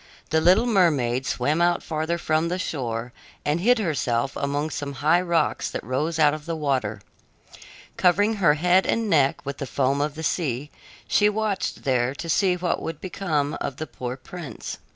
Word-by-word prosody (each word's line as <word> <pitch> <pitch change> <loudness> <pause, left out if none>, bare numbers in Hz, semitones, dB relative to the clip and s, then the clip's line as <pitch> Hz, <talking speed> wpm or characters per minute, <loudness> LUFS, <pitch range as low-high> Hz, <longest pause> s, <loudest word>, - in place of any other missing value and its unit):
The 160 0 +3
little 185 +8 +5
mermaid 145 - +2
swam 150 +7 0
out 175 0 +2
farther 160 +2 -2
from 155 0 0
the 180 +2 -1
shore 120 -8 -3 0.3
and 150 +3 +1
hid 245 +7 +4
herself 140 - -1
among 145 +2 -2
some 140 -1 -4
high 155 +6 +3
rocks 170 -2 0
that - - -5
rose 145 +7 -1
out 150 -2 +5
of 155 +1 -7
the 165 - -2
water. 130 -9 -1 1.0
Covering 205 +5 +3
her 170 -7 +4
head 180 +4 +3
and 225 -2 0
neck 140 -4 +2
with 140 0 -5
the 140 - -4
foam 135 +2 +1
of 150 0 -1
the 160 - -6
sea, 145 -4 -1 0.4
she 210 0 +4
watched 210 -2 -2
there 130 -1 +1
to 165 - -6
see 185 +2 +3
what 180 0 -1
would 165 -2 -5
become 160 -6 -2
of 140 - -3
the 155 - -4
poor 125 -3 -6
prince. 140 -2 -8
155 Hz, 180 wpm, -24 LUFS, 140-175 Hz, 1.0 s, little